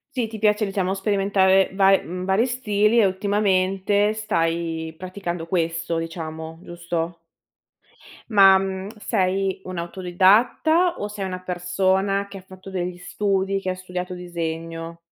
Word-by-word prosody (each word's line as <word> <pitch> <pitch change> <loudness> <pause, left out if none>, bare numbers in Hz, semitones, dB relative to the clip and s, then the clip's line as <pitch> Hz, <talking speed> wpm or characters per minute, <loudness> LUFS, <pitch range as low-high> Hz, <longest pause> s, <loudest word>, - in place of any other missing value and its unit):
Sì, 245 -3 0
ti 220 -1 -8
piace 210 0 +2
diciamo 195 -1 -1
sperimentare 195 -1 +3
va 195 0 +5
mhmm 180 0 -4
vari 195 +6 +2
stili 215 -3 +1
e 210 - +5
ultimamente 200 +1 +1
stai 165 -5 -2
praticando 180 -2 -5
questo, 165 -1 -1
diciamo, 160 -1 -6
giusto? 170 -1 -4 1.1
Ma, 195 -3 +7
mhmm, 190 0 -3 0.2
sei 190 -2 0
un'autodidatta 190 - +2
o 205 - -2
sei 205 -2 -5
una 185 -1 -4
persona 190 +2 0
che 200 - -9
ha - - -10
fatto 185 +1 -13
degli 180 -1 -3
studi, 195 +1 -1
che 190 - -4
ha - - -4
studiato 180 0 -5
disegno? 165 -1 -5
190 Hz, 130 wpm, -23 LUFS, 175-200 Hz, 1.1 s, Ma